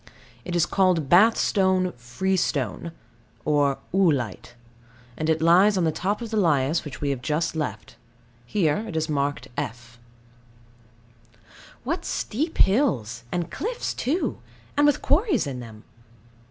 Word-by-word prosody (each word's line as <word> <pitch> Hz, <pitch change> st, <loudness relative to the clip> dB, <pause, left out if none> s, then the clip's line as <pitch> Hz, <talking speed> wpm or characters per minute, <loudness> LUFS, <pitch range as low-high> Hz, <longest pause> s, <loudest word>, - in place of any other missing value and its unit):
It 175 Hz, -, -4 dB
is 170 Hz, -, +3 dB
called 180 Hz, -7 st, +1 dB
Bath 215 Hz, +6 st, +6 dB
stone 185 Hz, -2 st, +2 dB
freestone, 145 Hz, -, -2 dB, 0.5 s
or 145 Hz, -2 st, +2 dB, 0.2 s
oolite; 135 Hz, -, 0 dB, 0.6 s
and 155 Hz, +4 st, -2 dB
it 160 Hz, 0 st, +1 dB
lies 190 Hz, +5 st, +5 dB
on 180 Hz, -, +1 dB
the 160 Hz, -, +2 dB
top 200 Hz, +8 st, -2 dB
of 225 Hz, -, -7 dB
the 220 Hz, -, -1 dB
lias, 155 Hz, -5 st, +2 dB
which 150 Hz, -, -9 dB
we 145 Hz, -1 st, 0 dB
have 130 Hz, -3 st, -4 dB
just 155 Hz, +4 st, -1 dB
left. 110 Hz, -10 st, -5 dB, 0.5 s
Here 160 Hz, -5 st, +1 dB
it 175 Hz, -, -7 dB
is 160 Hz, 0 st, -1 dB
marked 140 Hz, -3 st, -1 dB
F. 120 Hz, +2 st, -6 dB, 1.8 s
What -, -, -2 dB
steep 305 Hz, +9 st, -3 dB
hills, 125 Hz, -, +1 dB
and 175 Hz, -1 st, -2 dB
cliffs 470 Hz, +5 st, -3 dB
too, 315 Hz, +9 st, -1 dB, 0.4 s
and 290 Hz, 0 st, +4 dB
with 290 Hz, -, +1 dB
quarries 330 Hz, -, +2 dB
in 135 Hz, -3 st, -5 dB
them! 110 Hz, -3 st, -11 dB
160 Hz, 140 wpm, -24 LUFS, 135-195 Hz, 1.8 s, Bath